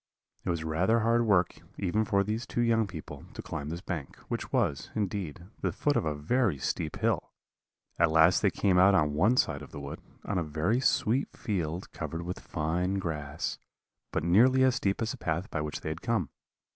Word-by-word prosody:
"It - - -3
was 85 -2 -1
rather 90 +9 +2
hard 115 +1 +3
work, 90 -5 +3 0.2
even 105 +4 +1
for 100 -3 +2
these 110 +4 -3
two 120 - -1
young 115 -2 +3
people, 85 -5 -8
to - - -5
climb 75 -2 -5
this 85 +2 -5
bank, 80 -8 -5
which - - -3
was, 70 - 0
indeed, 95 -6 -3
the - - 0
foot 145 -1 0
of - - +1
a 75 -1 -1
very 100 - +1
steep 75 +4 -2
hill; 110 -5 0 0.7
at 85 -1 +5
last 80 +3 +5
they 105 - +4
came 95 -1 +2
out 95 +2 +6
on 75 -5 +3
one 105 +12 +3
side 70 - +2
of 75 - -10
the 75 - -7
wood, 70 0 -7 0.2
on 100 -3 0
a - - 0
very 80 +10 0
sweet 130 0 +1
field, 90 -4 -3
covered 85 +1 -5
with 90 +2 -4
fine 90 +4 -1
grass, 80 -4 -3 0.5
but - - -1
nearly 125 +10 +5
as 130 -1 +5
steep 100 -1 0
as 115 - -1
the - - -6
path 85 +4 -2
by 75 - -1
which 75 0 -4
they - - -3
had 80 +2 -5
come. 115 - 0
90 Hz, 205 wpm, -29 LUFS, 80-110 Hz, 0.7 s, out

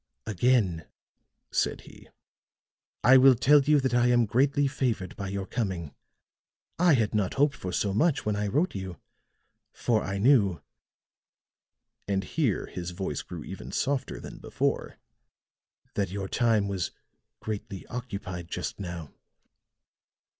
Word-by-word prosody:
"Again," 100 -6 +1 0.6
said - - 0
he, - - -15 0.9
"I 130 +2 +8
will 130 0 +7
tell 145 +5 +5
you 150 +1 +4
that 130 -2 0
I 120 0 +4
am 120 -1 +4
greatly 140 +6 +2
favored 125 -8 -1
by 100 - -5
your 95 0 -3
coming. 95 - -3 0.9
I 175 -3 +6
had 110 -4 0
not 105 -4 0
hoped 145 +1 +3
for 90 - -5
so 100 +2 0
much 145 - +2
when 105 -1 0
I 105 0 -1
wrote 150 - +1
you, 95 -3 -6 0.7
for 110 -3 0
I 95 +1 -3
knew," 100 -5 +4 1.5
and 100 -1 0
here 85 - 0
his 90 -1 -6
voice 90 -5 -3
grew - - -8
even - - -8
softer 135 -1 -1
than - - -9
before, - - -2 1.0
"that 100 -3 -1
your 95 +1 -4
time 110 -2 +2
was 95 -3 -2 0.5
greatly 100 -3 -5
occupied 100 -8 -6
just - - -4
now." 85 -5 -6
105 Hz, 135 wpm, -28 LUFS, 95-130 Hz, 1.5 s, I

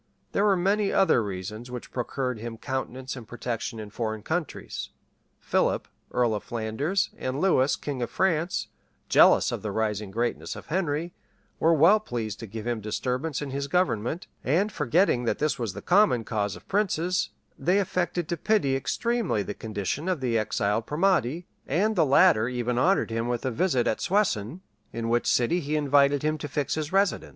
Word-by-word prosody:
There 200 - +2
were 200 -2 +4
many 200 +3 +1
other 190 -11 +4
reasons 105 +4 -6
which 125 -1 -7
procured 125 -1 -3
him 115 0 -6
countenance 130 0 -4
and 120 -4 -9
protection 115 -1 -4
in 105 -1 -8
foreign 110 -1 -3
countries. 160 +2 -4 0.5
Philip, - - 0 0.2
earl 120 -3 +2
of 105 - -3
Flanders,[*] 120 - -1
and 130 +2 -2
Lewis, 145 -7 +3
king 140 -4 -5
of 120 - -2
France,[] 170 +2 0 0.4
jealous - - +6
of - - -3
the - - -3
rising 105 -2 -1
greatness 120 +4 -2
of - - -9
Henry, 170 -2 -1 0.5
were 165 +1 +4
well 170 +8 +6
pleased 115 - -4
to 115 - -7
give 110 +2 -7
him 120 -2 -2
disturbance 130 +7 -2
in 140 - -5
his 140 +1 -3
government; 155 - 0 0.2
and 180 +11 +1
forgetting 150 - +2
that - - 0
this 150 -3 0
was 115 -6 -2
the 100 - -8
common 180 - +4
cause 105 -4 -2
of - - -14
princes, 185 -3 0 0.3
they 180 +3 +1
affected 180 -3 -1
to 170 - -1
pity 175 -8 +2
extremely 230 - 0
the 105 - -5
condition 110 - -3
of 180 -5 0
the 125 -3 -1
exiled 110 0 0
primate; 170 -2 +1 0.2
and 205 +9 +1
the 165 -5 +3
latter 135 -5 +5
even 125 -1 -1
honored 185 -4 +2
him 115 +1 -1
with 120 0 -2
a 130 - 0
visit 130 -2 +1
at 110 - 0
Soissons, 175 - 0 0.3
in 115 0 -3
which 120 +1 +1
city 125 +9 +2
he 150 -1 -2
had 150 - +1
invited 140 0 +4
him 155 0 0
to 150 - -4
fix 145 0 -1
his 155 -1 -3
residence. 195 +1 +1
135 Hz, 180 wpm, -26 LUFS, 115-175 Hz, 0.5 s, jealous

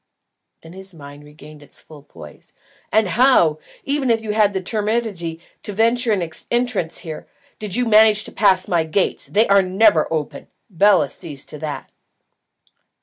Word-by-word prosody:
Then 165 +1 -14
as - - -13
his - - -12
mind 145 -1 -12
regained 150 0 -15
its 145 - -16
full 155 -2 -15
poise, 75 - -14 0.4
"And 220 -2 +2
how, 180 - +3 0.2
even 275 -2 -1
if 230 -1 +2
you 220 -1 -5
had 210 -1 +3
the 190 - -1
temerity 205 -4 -3 0.2
to 205 - -6
venture 230 +3 +2
an 185 -5 0 0.2
entrance 240 -9 -1
here, 155 -2 -8 0.3
did 210 -3 -4
you 245 +1 +1
manage 215 -1 +5
to - - -11
pass 190 -3 +2
my 170 -2 +1
gates? 160 +5 -2
They 215 +3 +2
are 200 0 +5
never 190 -3 +2
open. 155 -3 -4 0.2
Bela 190 -3 +3
sees 145 -1 -7
to 150 - -10
that." 150 -2 -6
190 Hz, 165 wpm, -19 LUFS, 160-220 Hz, 0.4 s, manage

